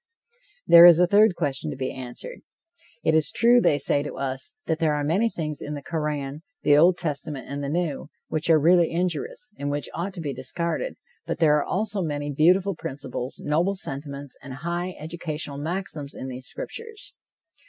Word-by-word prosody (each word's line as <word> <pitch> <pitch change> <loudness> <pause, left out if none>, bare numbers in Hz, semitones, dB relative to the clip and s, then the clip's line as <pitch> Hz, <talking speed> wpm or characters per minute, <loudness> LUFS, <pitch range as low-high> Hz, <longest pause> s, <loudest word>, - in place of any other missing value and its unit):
There 170 +1 +10
is 170 -1 +8
a 180 - +6
third 205 +1 +5
question 150 -2 -2
to 140 - -5
be 130 -1 -3
answered: 130 - -8 0.6
It 160 - +3
is 160 -1 +3
true, 240 +1 +5
they 145 - +3
say 145 0 +1
to 145 - -6
us, 135 -1 -4
that 160 -1 -1
there 155 -2 +2
are 145 - -1
many 190 +10 +2
things 155 -6 -4
in 150 - -5
the 145 - -7
Koran, 150 -3 -3 0.2
the 145 - +5
Old 170 +4 +5
Testament 150 -5 -4
and 140 +1 -4
the 140 - -2
New, 155 -3 -2 0.2
which 155 +1 -2
are 160 - +7
really 170 +2 +5
injurious, 425 - -3
and 145 - -2
which 145 0 -3
ought 185 +4 -4
to - - -7
be 145 -3 -3
discarded, 170 - -3 0.3
but - - -2
there 150 -2 +4
are 145 - +1
also 205 0 -1
many 145 -3 -2
beautiful 180 +7 +3
principles, 135 -4 -6
noble 170 +7 +1
sentiments 140 -4 -6
and 130 -1 -8
high 175 +1 -2
educational 155 -2 -5
maxims 160 -3 -4
in 130 - -6
these 130 0 -8
scriptures. 450 -2 -8
155 Hz, 185 wpm, -25 LUFS, 145-175 Hz, 0.6 s, There